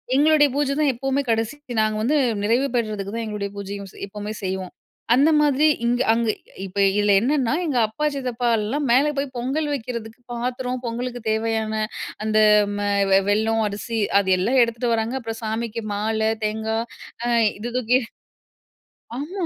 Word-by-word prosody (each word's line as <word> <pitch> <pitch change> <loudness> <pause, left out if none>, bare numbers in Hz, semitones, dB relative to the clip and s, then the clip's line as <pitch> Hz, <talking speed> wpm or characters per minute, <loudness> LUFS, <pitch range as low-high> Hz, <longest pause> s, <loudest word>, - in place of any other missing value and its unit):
எங்களுடைய 295 +1 +5
பூஜை 285 -1 +1
தான் 295 -3 +3
எப்பவுமே 270 +3 -1
கடைசி 225 +3 0 0.3
நாங்க 215 0 +1
வந்து 260 +8 +1 0.3
நிறைவு 235 +6 +2
பெற்றதுக்கு 210 -4 -2
தான் 230 - -2
எங்களுடைய 210 -2 -4
பூஜையும் 200 0 -6
செய் - - -10
எப்பவுமே 210 +1 -6
செய்வோம். 185 -1 -3 0.4
அந்த 280 +5 +5
மாதிரி 295 +1 +3 0.2
இங்க 245 +1 +1
அங்க 230 -1 0 0.4
இப்ப 195 +1 -10 0.2
இதில 205 0 +3
என்னன்னா, 260 -1 +1
எங்க 290 -6 -1
அப்பா, 220 +8 -3
சித்தப்பாலாம் 245 0 -1
மேல 265 +5 +5
போய் 275 -1 -2
பொங்கல் 275 +5 -1
வைக்கிறதுக்கு 230 -3 -5
பாத்திரம் 250 +1 -3
பொங்கலுக்கு 245 +1 -4
தேவையான 220 0 -1 0.5
அந்த 215 0 +1 0.4
மெ 205 0 -1 0.4
வெல்லம், 220 +2 +2
அரிசி 220 +3 -4 0.2
அது 190 -1 0
எல்லாம் 245 +8 +3
எடுத்துட்டு 235 +1 -1
வராங்க. 225 +3 -2
அப்புறம் 225 -1 -6
சாமிக்கு 225 +1 -3
மாலை, 220 +1 0 0.2
தேங்காய் 220 +1 -1 0.5
அ - - 0 0.3
இது 235 +3 -4
தூக்கி 250 +1 +3 1.2
ஆமா 350 +7 -4
230 Hz, 150 wpm, -22 LUFS, 215-260 Hz, 1.2 s, எங்களுடைய